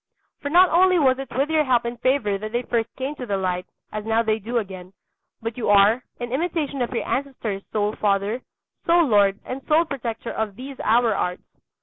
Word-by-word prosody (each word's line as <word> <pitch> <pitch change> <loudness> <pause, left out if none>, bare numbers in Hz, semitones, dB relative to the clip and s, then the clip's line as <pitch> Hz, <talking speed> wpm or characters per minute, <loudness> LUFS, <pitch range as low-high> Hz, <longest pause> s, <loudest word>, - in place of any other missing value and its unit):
For 285 - -3
not 355 +4 +6
only 365 +2 +5
was 265 -4 +3
it 270 -2 -6
with 280 +4 +1
your 310 -1 +3
help 250 -4 +2
and 235 0 -5
favour 245 -7 +1
that 215 +1 -6
they 240 +1 0
first 230 -1 -1
came 265 +2 -3
to 250 - -6
the 200 -2 0
light, 180 -1 -2 0.2
as 215 0 -4
now 225 +1 +1
they 220 -1 0
do 235 +4 -3
again, 190 -4 -5 0.5
but 230 +1 -4
you 230 - -1
are, 205 +4 +5 0.2
in 240 -1 -5
imitation 295 -2 -1
of 240 - 0
your 245 - -2
ancestors, 250 -7 -3
sole 210 0 0
father, 205 +3 0 0.5
sole 340 0 +5
lord, 205 -5 +3
and 260 +2 -5
sole 320 +2 +4
protector 235 -6 -5
of 215 -3 -3
these 265 +3 -9
our 230 0 +3
arts. 180 -2 -2
235 Hz, 210 wpm, -23 LUFS, 210-275 Hz, 0.5 s, not